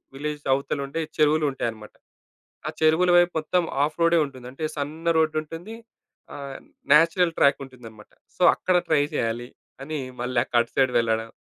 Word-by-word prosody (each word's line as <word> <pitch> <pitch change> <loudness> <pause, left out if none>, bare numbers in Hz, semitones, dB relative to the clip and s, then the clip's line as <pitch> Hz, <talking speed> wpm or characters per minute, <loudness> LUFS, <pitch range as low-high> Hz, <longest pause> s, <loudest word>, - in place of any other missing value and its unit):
Village 150 +1 -5
అవతల 140 +2 -2
ఉండే 140 +4 -4 0.2
చెరువులుంటాయన్నమాట. 140 -8 0 0.7
ఆ - - -1
చెరువుల 160 +3 +4
వైపు 175 0 +5
మొత్తం 175 +3 0
హాఫ్ 150 +2 0
రోడే 170 0 +4
ఉంటుంది. 130 -3 -11
అంటే 135 +4 -8
సన్న 155 +4 -2
రోడుంటుంది. 160 +6 -2 0.6
ఆహ్, 140 -1 -7 0.4
నాచురల్ 165 +2 +4
ట్రాకుంటుందన్నమాట. 125 -6 -1 0.3
సో, - - -11
అక్కడ 185 - 0
ట్రై 155 -3 +3
చేయాలి 120 +1 -2 0.3
అని, 155 +1 -4 0.2
మళ్ళీ 125 0 0
క - - -36
అటు 120 - -7
సైడ్ 130 -2 +2
వెళ్లడం, 115 -1 -1
145 Hz, 140 wpm, -24 LUFS, 130-160 Hz, 0.7 s, వైపు